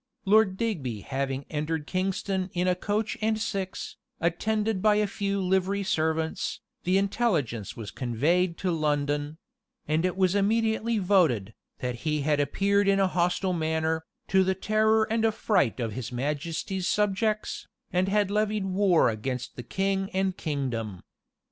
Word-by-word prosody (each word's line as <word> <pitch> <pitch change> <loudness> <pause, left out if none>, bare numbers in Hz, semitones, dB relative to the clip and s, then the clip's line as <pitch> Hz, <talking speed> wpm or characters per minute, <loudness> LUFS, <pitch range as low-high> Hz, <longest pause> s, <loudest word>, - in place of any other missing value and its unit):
Lord 200 -1 +4
Digby 145 - -2
having 135 +1 -3
entered 155 0 -2
Kingston 190 +1 -1
in 180 +1 0
a 180 - +4
coach 205 +4 -2
and 220 0 +1
six, 195 -3 -4 0.2
attended 210 +4 0
by 210 0 +4
a 210 0 +3
few 200 0 -2
livery 190 +1 +1
servants, 160 -3 -1 0.3
the 185 +2 +3
intelligence 180 - 0
was 110 -3 -6
conveyed 165 +9 +1
to 185 - -1
London; 145 -1 0 0.5
and 155 +2 +1
it 185 0 0
was 185 -1 +3
immediately 220 +2 +1
voted, 170 - +2 0.3
that 125 -1 -2
he 150 +3 -1
had 150 0 +1
appeared 200 +7 +2
in 195 0 +4
a 190 -1 +3
hostile 180 +1 +1
manner, 160 -1 0 0.2
to 190 -1 +4
the 190 0 +1
terror 220 +2 +3
and 225 +1 0
affright 210 - +1
of 115 -2 -1
his 125 0 -5
majesty's 155 +8 -2
subjects, 210 +1 0 0.3
and 180 +1 +2
had 205 -1 +2
levied 210 -1 0
war 190 -2 +3
against 125 +3 -3
the - - -6
king 195 - -1
and 190 -1 +1
kingdom. 120 - -3
185 Hz, 150 wpm, -27 LUFS, 150-200 Hz, 0.5 s, Lord